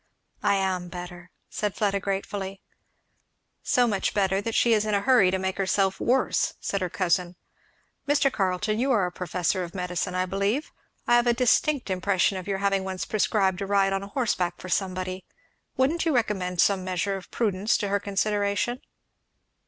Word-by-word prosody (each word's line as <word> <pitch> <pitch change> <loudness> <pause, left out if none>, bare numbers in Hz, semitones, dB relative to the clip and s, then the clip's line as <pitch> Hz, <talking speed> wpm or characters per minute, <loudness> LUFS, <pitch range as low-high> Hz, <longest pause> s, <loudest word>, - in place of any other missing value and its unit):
"I 200 -1 +3
am 190 -2 -1
better," 175 0 -8 0.2
said 210 -2 -3
Fleda 200 -2 +1
gratefully. 195 0 -4 1.0
"So 245 - +3
much 200 -5 -1
better 195 -1 +2
that 225 +2 -3
she 235 - +4
is 210 -1 +3
in 215 -1 0
a 200 - +1
hurry 240 -5 +5
to 190 - 0
make 190 +1 -3
herself 195 0 +1
worse," 260 +2 +1
said 200 - -2
her 180 - -1
cousin. 180 0 0 0.7
"Mr. 285 -2 +3
Carleton, 195 +2 0
you 265 +3 +1
are 210 -7 +3
a 180 - -3
professor 180 +1 -1
of 170 +1 -8
medicine, 180 0 -2
I 185 0 +1
believe, 200 +9 -1 0.3
I 240 - +5
have 240 0 +2
an 240 - +5
indistinct 255 0 +2
impression 190 +1 +1
of 185 - -9
your 195 -1 -1
having 195 0 +1
once 190 -1 -4
prescribed 200 -3 +1
a 195 - -2
ride 195 -1 +2
on 195 - -1
horseback 200 -5 -1
for 185 - -8
somebody; 185 0 -2 0.5
wouldn't 290 +6 +2
you 325 -4 +1
recommend 185 -7 0
some 195 -2 +2
measure 185 +2 -1
of 190 -2 -9
prudence 210 -1 0
to 205 - -2
her 200 0 +1
consideration?" 205 +4 -1
195 Hz, 175 wpm, -26 LUFS, 185-215 Hz, 1.0 s, hurry